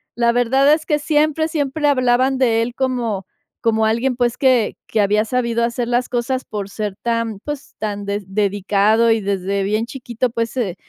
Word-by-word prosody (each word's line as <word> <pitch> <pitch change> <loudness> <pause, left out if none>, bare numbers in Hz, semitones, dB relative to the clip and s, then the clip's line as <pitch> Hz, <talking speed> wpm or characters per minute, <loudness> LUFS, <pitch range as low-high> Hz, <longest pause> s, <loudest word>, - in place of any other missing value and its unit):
la 235 0 +3
verdad 265 +4 +3
es 310 0 -1
que 300 -1 +1
siempre, 310 +1 +1
siempre 295 -1 -1
hablaban 255 -1 +2
de 230 -3 +2
él 240 +1 -5
como 240 -7 -1 0.4
como 220 -1 +2
alguien, 235 +4 +1
pues, 245 -1 0
que 255 -5 +2
que 220 - -1
había 210 +1 +2
sabido 235 0 0
hacer 235 0 -1
las 245 +1 0
cosas 255 +2 -1
por 205 -2 -5
ser 205 -1 -4
tan, 230 -3 -1
pues, 295 +1 -7
tan 205 -2 -3
des 200 0 -3
dedicado 205 +2 +2
y 225 -1 +2
desde 195 0 -1
bien 215 +3 0
chiquito, 245 0 -3
pues, 230 0 -3
eh, 200 -8 -1
235 Hz, 180 wpm, -19 LUFS, 215-255 Hz, 0.4 s, la